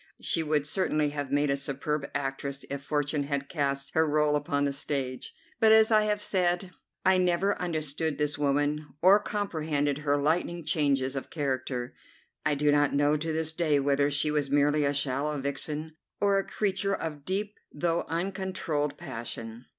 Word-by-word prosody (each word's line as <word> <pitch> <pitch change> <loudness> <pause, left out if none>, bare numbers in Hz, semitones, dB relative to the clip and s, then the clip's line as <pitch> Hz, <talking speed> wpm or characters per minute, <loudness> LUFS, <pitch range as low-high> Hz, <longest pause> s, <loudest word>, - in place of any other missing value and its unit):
She 165 - 0
would 150 -2 +1
certainly 150 -3 +1
have 145 -2 -4
made 145 0 +2
a - - +2
superb 140 +1 -3
actress 140 0 -3
if 140 0 -3
Fortune 145 0 -1
had 140 -1 -2
cast 140 -3 -2
her 160 0 +3
rôle 150 0 +3
upon 145 -1 0
the 140 -1 0
stage. 135 -2 -3 0.3
But, 220 -2 +6
as 220 0 +6
I 215 -1 +5
have 210 0 0
said, 180 -1 0 0.3
I 190 0 +5
never 180 +3 +2
understood 155 -3 -2
this 150 -1 0
woman, 145 +1 0 0.2
or 195 +3 +7
comprehended 155 -9 -1
her 145 -1 +1
lightning 165 +3 0
changes 140 -4 +1
of 135 - -5
character. 130 -4 -2 0.5
I 150 - +2
do 145 +1 +2
not 145 -1 +3
know 145 +1 +3
to 160 +2 -3
this 160 0 -1
day 155 -4 +2
whether 140 +1 +2
she 145 +1 +2
was 145 -2 0
merely 145 +1 +3
a 140 - +1
shallow 140 +2 0
vixen 150 +3 -3 0.2
or 200 -1 +3
a 195 - -4
creature 200 -1 0
of 150 -5 -5
deep 200 +5 -3
though 170 +2 0
uncontrolled 170 -5 -2
passion. 115 +1 -6
150 Hz, 170 wpm, -28 LUFS, 140-170 Hz, 0.5 s, or